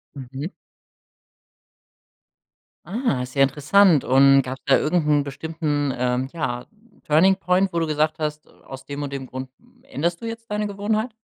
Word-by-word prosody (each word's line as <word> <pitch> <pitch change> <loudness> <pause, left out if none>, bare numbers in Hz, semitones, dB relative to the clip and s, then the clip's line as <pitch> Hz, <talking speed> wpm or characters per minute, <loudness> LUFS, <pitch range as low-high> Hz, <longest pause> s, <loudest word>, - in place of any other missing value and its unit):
Mhm. 135 - -6 2.3
Ah, 210 - -1
ist 125 +2 -7
ja 135 - +5
interessant. 150 +4 +4
Und 135 +1 +5
gab's 130 +1 -7
da 135 - +5
irgend 155 0 0
'n 145 -1 +3
bestimmten 145 -1 -2
ähm 125 +1 -1
ja, 125 -7 -3 0.4
Turning-Point, 185 +3 +3
wo 170 - +1
du 165 - +1
gesagt 155 0 0
hast, 150 -1 -4
aus 135 0 -12
dem 145 +1 -5
und 140 -1 -5
dem 135 -2 -5
Grund, 130 0 -7 0.3
änderst 175 -11 -3
du - - -6
jetzt 230 0 -7
deine 210 0 -1
Gewohnheit? 215 +3 -2
150 Hz, 150 wpm, -23 LUFS, 135-185 Hz, 2.3 s, ja